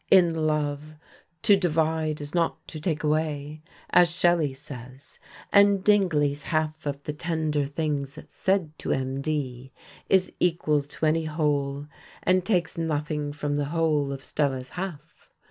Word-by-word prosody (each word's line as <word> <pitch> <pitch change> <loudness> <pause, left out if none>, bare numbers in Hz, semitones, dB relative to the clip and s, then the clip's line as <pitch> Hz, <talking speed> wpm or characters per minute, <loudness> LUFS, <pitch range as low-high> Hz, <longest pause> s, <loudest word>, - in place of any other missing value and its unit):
In 180 -3 +6
love 155 -1 -1 0.5
"to 205 - +7
divide 160 -4 0
is 145 0 -7
not 170 -2 -1
to 155 - -7
take 160 -1 -2
away," 150 -1 -1 0.3
as 175 -1 +6
Shelley 170 -3 +2
says; 130 -1 -11 0.3
and 200 -1 +5
Dingley's 155 -9 +3
half 155 0 -2
of 140 0 -4
the 150 - -4
tender 155 -3 -1
things 145 -2 -2
said 185 -5 0
to - - -5
MD 135 -1 -2 0.4
is 190 -1 +3
equal 165 -4 +2
to 145 +3 -4
any 160 +1 +2
whole, 145 -2 -1 0.4
and 185 0 +3
takes 175 -5 0
nothing 150 -2 -1
from 145 0 -2
the 145 - 0
whole 150 -2 +1
of 135 -1 -6
Stella's 130 -3 -1
half. 165 -3 -7
155 Hz, 140 wpm, -26 LUFS, 145-165 Hz, 0.5 s, to